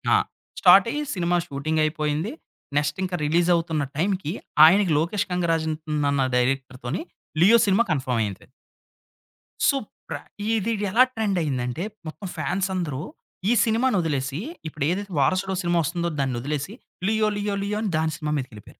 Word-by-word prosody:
ఆ! - - +6 0.4
స్టార్ట్ - - +7
అయ్యి 295 - -2
cinema 175 -1 +1
shooting 155 +2 -1
అయిపోయింది. 155 +5 -1 0.5
నెక్స్ట్ 145 0 0
ఇంకా 185 -1 -2
రిలీజ్ 170 +4 +2
అవుతున్న 160 -3 -1
టైంకి 185 -2 0 0.3
ఆయనకి 185 +2 +5
'లోకేష్ 200 +6 -1
కంగరాజు' 165 -3 0 0.4
అన్న 135 -2 +2
డైరెక్టర్‌ 130 0 -1
తోని 135 - -2 0.4
'లియో' 220 +6 +7
సినిమా 200 +4 +4
కన్ఫార్మ్ 130 -5 0
అయింది. 100 -3 -5 1.2
సో 280 - +4 0.3
ప్రతీది 220 +1 -2 0.2
ఎలా 230 +6 +6
ట్రెండ్ 210 -4 0
అయింది 135 -6 -1
అంటే, 125 +8 -3 0.2
మొత్తం 190 +5 -7
ఫ్యాన్స్ 190 0 -1
అందరూ 150 -7 -2 0.5
ఈ - - +5
సినిమాని 230 +1 +2
వదిలేసి, 140 -3 -2 0.3
ఇప్పుడు 150 -2 -3
ఏదైతే 200 +2 -2
'వారసుడు' 185 +7 +1
సినిమా 175 0 +2
వస్తుందో 170 +2 -1
దాన్ని 135 -2 0
వదిలేసి 150 - -3 0.3
"లియో, 220 0 +2
లియో, 205 0 -1
లియో" 205 +1 -2
అని 215 - -1
దాని 160 0 +1
సినిమా 150 -2 -3
మీదకి 130 -2 -4
వెళ్ళిపోయారు. 105 -1 -14
170 Hz, 155 wpm, -24 LUFS, 145-195 Hz, 1.2 s, స్టార్ట్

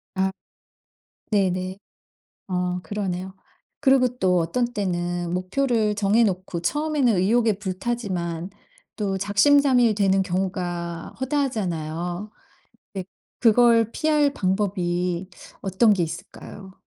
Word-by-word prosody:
아. 190 0 +1 1.0
네네. 185 -1 0 0.7
어 180 -1 -1
그러네요. 190 0 -4 0.5
그리고 265 -2 +4
또 180 -4 +2
어떤 240 +9 -1
때는 175 -3 -2
목표를 215 +3 0
정해놓고 200 -4 +1
처음에는 290 - +1
의욕에 220 +5 +3
불타지만 185 -4 -3 0.5
또 200 -3 -1
작심삼일 245 +4 +4
되는 195 -1 +3
경우가 175 -2 -3
허다하잖아요. 185 - -2 0.6
네. 190 -2 -4 0.3
그걸 230 -1 +4
피할 300 -2 +2
방법이 180 -2 -1 0.3
어떤 200 +3 +3
게 190 -3 +1
있을까요? 175 +4 -8
195 Hz, 230 characters per minute, -24 LUFS, 180-230 Hz, 1.0 s, 그리고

